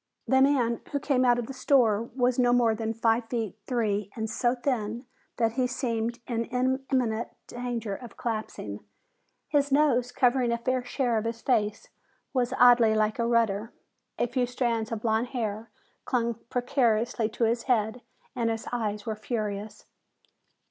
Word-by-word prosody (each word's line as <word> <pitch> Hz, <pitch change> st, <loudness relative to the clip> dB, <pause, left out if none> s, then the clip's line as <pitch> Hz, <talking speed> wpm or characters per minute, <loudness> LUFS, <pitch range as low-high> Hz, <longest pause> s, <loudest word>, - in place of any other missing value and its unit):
The 265 Hz, 0 st, +4 dB
man 255 Hz, -4 st, +3 dB
who 285 Hz, -, 0 dB
came 265 Hz, -2 st, +1 dB
out 245 Hz, -1 st, +4 dB
of 240 Hz, -, -2 dB
the 270 Hz, -, -7 dB
store 240 Hz, -5 st, +2 dB
was 250 Hz, -1 st, +2 dB
no 245 Hz, -1 st, +4 dB
more 235 Hz, -2 st, +4 dB
than 220 Hz, 0 st, -2 dB
five 225 Hz, +1 st, +1 dB
feet 225 Hz, -5 st, -2 dB
three 210 Hz, -5 st, 0 dB
and 220 Hz, -1 st, -2 dB
so 240 Hz, +1 st, +1 dB
thin 240 Hz, -2 st, -2 dB, 0.3 s
that 230 Hz, -2 st, +2 dB
he 250 Hz, +2 st, 0 dB
seemed 235 Hz, -2 st, -2 dB
in 230 Hz, -1 st, -2 dB
imminent 255 Hz, -2 st, 0 dB, 0.2 s
danger 240 Hz, -4 st, -4 dB
of 240 Hz, -3 st, -12 dB
collapsing. 215 Hz, -, -4 dB, 0.7 s
His 285 Hz, -1 st, +1 dB
nose, 265 Hz, -4 st, +3 dB
covering 250 Hz, -1 st, +2 dB
a 235 Hz, -, +1 dB
fair 255 Hz, +2 st, -1 dB
share 245 Hz, -2 st, 0 dB
of 215 Hz, -, -5 dB
his 230 Hz, 0 st, -4 dB
face, 215 Hz, -4 st, 0 dB, 0.4 s
was 250 Hz, -1 st, +1 dB
oddly 240 Hz, -3 st, +6 dB
like 215 Hz, +1 st, +1 dB
a 235 Hz, -, +1 dB
rudder. 225 Hz, -2 st, +1 dB, 0.4 s
A -, -, +2 dB
few 245 Hz, +1 st, 0 dB
strands 235 Hz, -2 st, -1 dB
of 220 Hz, -2 st, -4 dB
blond 225 Hz, +1 st, +1 dB
hair 220 Hz, 0 st, -3 dB, 0.4 s
clung 235 Hz, -2 st, 0 dB, 0.2 s
precariously 240 Hz, -3 st, +1 dB
to 230 Hz, +2 st, -3 dB
his 230 Hz, +1 st, +1 dB
head 220 Hz, 0 st, +1 dB, 0.3 s
and 235 Hz, -2 st, 0 dB
his 225 Hz, 0 st, -3 dB
eyes 210 Hz, -3 st, -2 dB
were 220 Hz, -, -2 dB
furious. 215 Hz, -2 st, -4 dB
235 Hz, 160 wpm, -27 LUFS, 220-250 Hz, 0.7 s, oddly